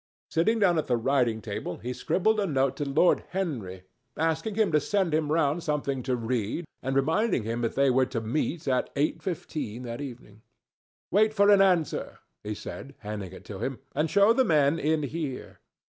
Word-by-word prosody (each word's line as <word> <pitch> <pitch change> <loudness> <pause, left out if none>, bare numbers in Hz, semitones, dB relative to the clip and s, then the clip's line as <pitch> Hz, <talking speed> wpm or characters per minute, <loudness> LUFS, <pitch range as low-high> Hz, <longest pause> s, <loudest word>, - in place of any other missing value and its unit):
Sitting 215 +8 +2
down 180 -6 +3
at - - -3
the 120 - +2
writing 115 -3 +1
table 100 -4 -4
he 125 +2 -5
scribbled 215 - +1
a 200 - +1
note 135 -4 +1
to 145 - -2
Lord 155 +6 +3
Henry, 120 - -4 0.3
asking 160 +6 0
him 215 -4 +2
to 150 - +4
send 175 +3 0
him 155 -1 +1
round 155 0 +2
something 145 -4 -1
to 125 0 -1
read 120 +5 -2 0.2
and 135 0 -2
reminding 160 - +2
him 115 +2 -3
that 115 - -1
they 140 -1 +4
were 130 0 +3
to 115 - -3
meet 150 +8 -2
at 130 -1 +1
eight 145 +2 0
fifteen 150 - -4
that 120 +2 -5
evening. 120 -6 -9 0.7
"Wait 215 +3 +3
for 200 0 +5
an 200 -1 +6
answer," 180 -6 +1 0.3
he 105 0 -4
said, 140 +6 -8
handing 105 -4 -5
it 95 - -12
to 100 -2 -7
him, 135 -2 -3 0.2
"and 155 +3 0
show 200 +7 +5
the 260 +2 +3
men 155 - +3
in 155 0 +1
here." 145 -2 -5
145 Hz, 190 wpm, -27 LUFS, 120-170 Hz, 0.7 s, an